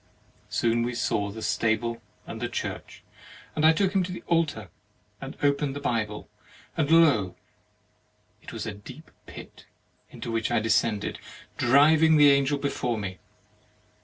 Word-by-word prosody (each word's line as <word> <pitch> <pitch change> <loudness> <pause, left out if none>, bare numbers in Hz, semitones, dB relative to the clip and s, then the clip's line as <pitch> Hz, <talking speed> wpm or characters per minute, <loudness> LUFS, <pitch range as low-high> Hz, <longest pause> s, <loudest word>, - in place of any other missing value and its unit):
Soon 115 0 +1
we 120 +1 -2
saw 105 -4 -1
the 110 +2 -8
stable 115 +1 -1 0.2
and 110 - -8
the 120 - -2
church, 120 - -6 0.5
and 155 - -1
I 160 - +7
took 190 +3 0
him 195 - +2
to 180 - -7
the 180 - -8
altar 150 - -1 0.5
and - - -8
opened 140 -1 +1
the - - -4
Bible, 110 -6 -3 0.5
and 150 -3 0
lo! 145 - +4 1.1
it - - -11
was - - -6
a 110 - -4
deep 130 +10 -13 0.2
pit, - - -12 0.4
into 115 - -7
which 115 -1 -1
I - - +2
descended, 110 -1 0 0.4
driving 155 +5 +5
the 145 -1 +7
Angel 140 +1 +2
before 125 -4 -2
me. 95 -3 -6
125 Hz, 150 wpm, -26 LUFS, 110-150 Hz, 1.1 s, I